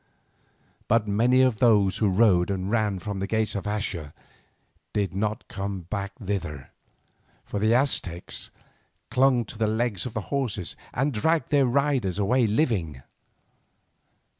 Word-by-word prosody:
But 115 Hz, -1 st, +2 dB
many 120 Hz, +5 st, +3 dB
of 125 Hz, -5 st, +2 dB
those 105 Hz, -5 st, +4 dB
who 110 Hz, -2 st, +2 dB
rode 95 Hz, -3 st, +3 dB
and 95 Hz, 0 st, -2 dB
ran 110 Hz, -4 st, +1 dB
from 100 Hz, +2 st, -5 dB
the 95 Hz, -, -2 dB
gates 110 Hz, 0 st, 0 dB
of 100 Hz, -, -4 dB
Axa 100 Hz, -7 st, -3 dB, 0.8 s
did 100 Hz, -3 st, -1 dB
not 105 Hz, +2 st, -2 dB
come 100 Hz, -1 st, -4 dB
back 100 Hz, +3 st, -5 dB
thither, 85 Hz, -, -4 dB, 0.7 s
for 105 Hz, -, -4 dB
the 110 Hz, +3 st, +3 dB
Aztecs 100 Hz, -10 st, 0 dB, 0.6 s
clung 130 Hz, -2 st, +3 dB
to 105 Hz, -, -10 dB
the 110 Hz, -, +2 dB
legs 110 Hz, -2 st, 0 dB
of 120 Hz, -, -9 dB
the 110 Hz, -, -1 dB
horses 120 Hz, -10 st, -2 dB, 0.2 s
and 135 Hz, +3 st, 0 dB
dragged 160 Hz, +10 st, +1 dB
their 140 Hz, -3 st, +4 dB
riders 130 Hz, -7 st, +1 dB
away 115 Hz, +4 st, +2 dB
living. 100 Hz, -, 0 dB
105 Hz, 140 wpm, -26 LUFS, 95-120 Hz, 0.8 s, those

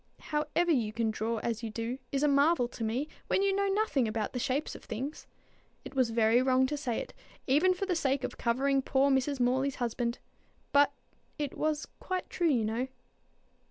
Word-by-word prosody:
How 300 Hz, 0 st, -1 dB
ever 345 Hz, 0 st, +3 dB
you 235 Hz, -8 st, +1 dB
can 220 Hz, 0 st, 0 dB
draw 225 Hz, +2 st, -2 dB
as 230 Hz, -1 st, -1 dB
you 230 Hz, -, -4 dB
do, 230 Hz, +4 st, -4 dB
is 275 Hz, +1 st, 0 dB
a -, -, +5 dB
marvel 280 Hz, -1 st, +4 dB
to 240 Hz, -, -7 dB
me, 240 Hz, +7 st, -1 dB, 0.2 s
when 390 Hz, -, +2 dB
you 395 Hz, -1 st, +2 dB
know 400 Hz, 0 st, +1 dB
nothing 390 Hz, -, +1 dB
about 215 Hz, -1 st, -2 dB
the 250 Hz, -, -2 dB
shapes 265 Hz, +4 st, -1 dB
of -, -, -11 dB
things. 260 Hz, +7 st, -5 dB, 0.6 s
It -, -, -8 dB
was 260 Hz, -3 st, +2 dB
very 225 Hz, +1 st, +4 dB
wrong 260 Hz, 0 st, +3 dB
to 290 Hz, +3 st, -2 dB
say 255 Hz, -5 st, -2 dB
it, -, -, -5 dB, 0.3 s
even 325 Hz, +8 st, +4 dB
for 390 Hz, -, -2 dB
the 370 Hz, -2 st, 0 dB
sake 275 Hz, -4 st, 0 dB
of -, -, -3 dB
covering 270 Hz, +3 st, +2 dB
poor 275 Hz, +1 st, +2 dB
Mrs. 265 Hz, +1 st, +1 dB
Morley's 260 Hz, +3 st, +1 dB
husband; 235 Hz, 0 st, -2 dB, 0.5 s
but 285 Hz, 0 st, +5 dB, 0.5 s
it 290 Hz, -3 st, -3 dB
was 310 Hz, -1 st, -1 dB
quite 370 Hz, -1 st, -3 dB
true 345 Hz, -2 st, +1 dB
you 240 Hz, -7 st, +2 dB
know." 230 Hz, +4 st, -1 dB
265 Hz, 200 wpm, -30 LUFS, 235-295 Hz, 0.6 s, a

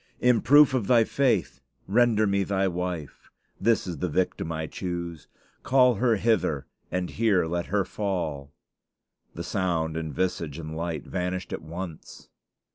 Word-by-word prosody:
In 125 Hz, -2 st, +4 dB
proof 145 Hz, 0 st, +6 dB
of 120 Hz, -7 st, 0 dB
thy 120 Hz, -2 st, +5 dB
faith, 120 Hz, -5 st, 0 dB, 0.3 s
render 110 Hz, 0 st, +3 dB
me 100 Hz, -1 st, +1 dB
thy 95 Hz, 0 st, 0 dB
wife. 90 Hz, -4 st, -5 dB, 0.3 s
This 115 Hz, +2 st, +2 dB
is 85 Hz, -5 st, -5 dB
the 90 Hz, -, -1 dB
victim 85 Hz, 0 st, -1 dB
I 80 Hz, -1 st, -3 dB
choose. 85 Hz, -2 st, -5 dB, 0.3 s
Call 125 Hz, -1 st, +4 dB
her 120 Hz, -3 st, +4 dB
hither, 105 Hz, -, +1 dB, 0.2 s
and 90 Hz, 0 st, -2 dB
here 100 Hz, 0 st, +2 dB
let 85 Hz, +1 st, -2 dB
her 100 Hz, -1 st, +1 dB
fall." 80 Hz, -10 st, -3 dB, 0.8 s
The 85 Hz, -, -5 dB
sound 85 Hz, -4 st, -1 dB
and 80 Hz, -1 st, -3 dB
visage 80 Hz, -1 st, -2 dB
and 80 Hz, -1 st, -6 dB
light 80 Hz, -3 st, -3 dB
vanished 90 Hz, +1 st, -3 dB
at -, -, -4 dB
once. 85 Hz, 0 st, -8 dB
90 Hz, 150 wpm, -26 LUFS, 80-110 Hz, 0.8 s, proof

